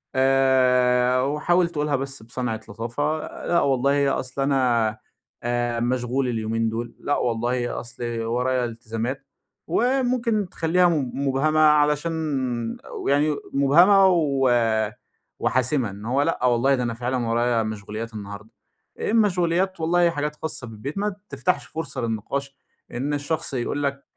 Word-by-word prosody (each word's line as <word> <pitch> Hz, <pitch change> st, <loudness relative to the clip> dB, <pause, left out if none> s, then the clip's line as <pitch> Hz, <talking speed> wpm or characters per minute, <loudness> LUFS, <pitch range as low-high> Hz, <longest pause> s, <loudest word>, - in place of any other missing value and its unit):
آآ، 130 Hz, -1 st, +3 dB
وحاوِل 170 Hz, +6 st, +1 dB
تَقولها 150 Hz, -3 st, -1 dB
بس 135 Hz, -2 st, -5 dB
بصَنعِة 115 Hz, -1 st, -3 dB
لطافة 120 Hz, +9 st, -2 dB, 0.3 s
لأ 170 Hz, -, +3 dB
والله 140 Hz, +1 st, +2 dB
أصل 130 Hz, +1 st, -5 dB
أنا 125 Hz, -5 st, +2 dB, 0.5 s
آآ 120 Hz, 0 st, -1 dB
مشغول 125 Hz, +2 st, 0 dB
اليومين 115 Hz, -1 st, -1 dB
دول، 115 Hz, +1 st, -4 dB
لأ 145 Hz, -, 0 dB
والله 120 Hz, +1 st, -1 dB
أصل 120 Hz, +1 st, -9 dB, 0.2 s
ورايا 125 Hz, +2 st, 0 dB
التزامات. 115 Hz, +3 st, -5 dB, 0.4 s
وممكن 240 Hz, -1 st, +1 dB
تخليها 175 Hz, +3 st, +2 dB
مب 145 Hz, -7 st, -1 dB
مُبهَمَة 140 Hz, +3 st, +1 dB
علشان 150 Hz, +1 st, +4 dB, 0.8 s
و -, -, -5 dB
يعني 145 Hz, +2 st, +2 dB, 0.2 s
مُبهَمَة 175 Hz, +9 st, +6 dB
و 145 Hz, -7 st, +2 dB, 0.9 s
وحاسمة. 130 Hz, -1 st, +1 dB
إن 100 Hz, +2 st, -10 dB
هو 130 Hz, +4 st, +1 dB
لأ 145 Hz, -4 st, 0 dB
والله 125 Hz, +3 st, +3 dB
ده 125 Hz, -, -2 dB
أنا 120 Hz, -1 st, -2 dB
فعلًا 120 Hz, +1 st, -2 dB
ورايا 115 Hz, 0 st, +1 dB
مشغوليات 110 Hz, +1 st, -6 dB
النهاردة، 100 Hz, 0 st, -8 dB, 0.5 s
إيه -, -, -1 dB
المَشغوليات؟ 185 Hz, -4 st, +2 dB
والله 170 Hz, +2 st, +3 dB
حاجات 150 Hz, -2 st, -3 dB
خاصَّة 150 Hz, -5 st, -5 dB
بالبيت. 115 Hz, -, -7 dB
ما 205 Hz, -1 st, -1 dB
تفتحش 180 Hz, -, -1 dB
فُرصة 140 Hz, -5 st, -5 dB
للنقاش 130 Hz, +5 st, -3 dB, 0.3 s
إن 135 Hz, +4 st, -2 dB
الشخص 145 Hz, +1 st, -2 dB
يقول 135 Hz, +4 st, -2 dB
لك 140 Hz, 0 st, -2 dB
135 Hz, 130 wpm, -24 LUFS, 120-150 Hz, 0.9 s, مُبهَمَة